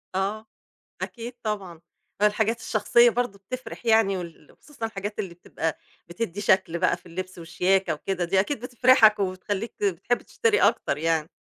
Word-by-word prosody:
آه 205 Hz, +3 st, -1 dB, 0.6 s
أكيد 240 Hz, +1 st, -6 dB
طبعًا، 195 Hz, -6 st, -4 dB, 0.4 s
الحاجات 220 Hz, +2 st, +2 dB
الشخصية 230 Hz, +2 st, +4 dB
برضه 245 Hz, -4 st, -2 dB
بتفرِح 240 Hz, +3 st, -8 dB
يعني، 220 Hz, -3 st, +4 dB
وال 170 Hz, -4 st, -9 dB
و -, -, -26 dB
خصوصًا 270 Hz, -7 st, -6 dB
الحاجات 205 Hz, 0 st, -6 dB
اللي 180 Hz, -4 st, -4 dB
بتبقى 160 Hz, -2 st, -4 dB, 0.3 s
بتدي 185 Hz, +1 st, -4 dB
شكل 190 Hz, -4 st, +2 dB
بقى 185 Hz, -, +2 dB
في 180 Hz, -, -23 dB
اللبس 185 Hz, +2 st, -6 dB
والشياكة 180 Hz, +2 st, +1 dB
وكده، 180 Hz, +3 st, -2 dB
دي 190 Hz, +3 st, +2 dB
أكيد 230 Hz, +5 st, -2 dB
بتفرحك 245 Hz, -3 st, +5 dB
وبتخليك 195 Hz, +3 st, -3 dB
بتحب 400 Hz, -, 0 dB
تشتري 445 Hz, -2 st, +1 dB
أكتر 140 Hz, -, +2 dB
يعني 160 Hz, -1 st, 0 dB
200 Hz, 150 wpm, -25 LUFS, 180-230 Hz, 0.6 s, بتفرحك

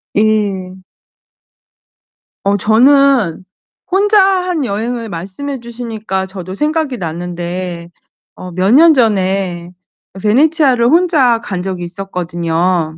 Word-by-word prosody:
예. 205 Hz, -3 st, 0 dB, 1.7 s
어 200 Hz, +1 st, +2 dB
저는 235 Hz, -, +3 dB, 0.5 s
혼자 410 Hz, +2 st, +4 dB
한 365 Hz, -5 st, 0 dB
여행을 230 Hz, +2 st, -3 dB
말씀해 195 Hz, +11 st, -6 dB
주시니까 225 Hz, -5 st, -5 dB
저도 190 Hz, -1 st, -8 dB
생각이 300 Hz, +1 st, -1 dB
났는데, 175 Hz, 0 st, -5 dB, 0.5 s
어 180 Hz, -1 st, -9 dB
몇 185 Hz, +3 st, 0 dB
년 320 Hz, +4 st, +7 dB
전에 190 Hz, -7 st, 0 dB, 0.5 s
베네치아를 260 Hz, -, +3 dB
혼자 300 Hz, -6 st, +3 dB
간 190 Hz, -6 st, -5 dB
적이 185 Hz, -2 st, -4 dB
있었거든요. 175 Hz, -2 st, -2 dB
205 Hz, 210 characters per minute, -15 LUFS, 180-265 Hz, 1.7 s, 년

